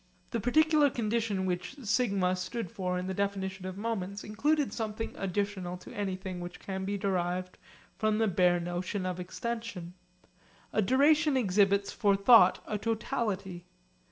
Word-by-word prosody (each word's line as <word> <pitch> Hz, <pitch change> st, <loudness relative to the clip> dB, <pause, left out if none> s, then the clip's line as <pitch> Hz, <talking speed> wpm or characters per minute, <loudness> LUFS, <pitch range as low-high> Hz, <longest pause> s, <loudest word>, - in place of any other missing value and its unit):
The 235 Hz, -, -1 dB
particular 305 Hz, +5 st, +4 dB
condition 225 Hz, -5 st, -1 dB
which 180 Hz, +5 st, -3 dB
'σ' 200 Hz, -7 st, +1 dB
stood 195 Hz, 0 st, -4 dB
for 180 Hz, -1 st, -2 dB
in 180 Hz, -, -3 dB
the 190 Hz, -, -3 dB
definition 190 Hz, -1 st, -2 dB
of 185 Hz, 0 st, -6 dB
moments 200 Hz, -2 st, -3 dB
included 290 Hz, +7 st, 0 dB
something 220 Hz, -1 st, -4 dB
additional 195 Hz, -2 st, -2 dB
to 180 Hz, -, -12 dB
anything 190 Hz, -2 st, -4 dB
which 175 Hz, 0 st, -7 dB
can 190 Hz, -1 st, -4 dB
be 200 Hz, +1 st, -1 dB
derived 185 Hz, -2 st, -2 dB, 0.4 s
from 215 Hz, -1 st, +2 dB
the 220 Hz, 0 st, +2 dB
bare 180 Hz, -2 st, +3 dB
notion 175 Hz, +3 st, -3 dB
of 180 Hz, -1 st, -3 dB
extension. 215 Hz, -2 st, -5 dB, 0.8 s
A 215 Hz, -, +3 dB
duration 290 Hz, -, +4 dB
exhibits 200 Hz, -2 st, +2 dB
for 200 Hz, -2 st, +3 dB
thought 225 Hz, +4 st, +6 dB
a 210 Hz, -, -3 dB
totality. 205 Hz, -6 st, -2 dB
200 Hz, 145 wpm, -30 LUFS, 185-225 Hz, 0.8 s, thought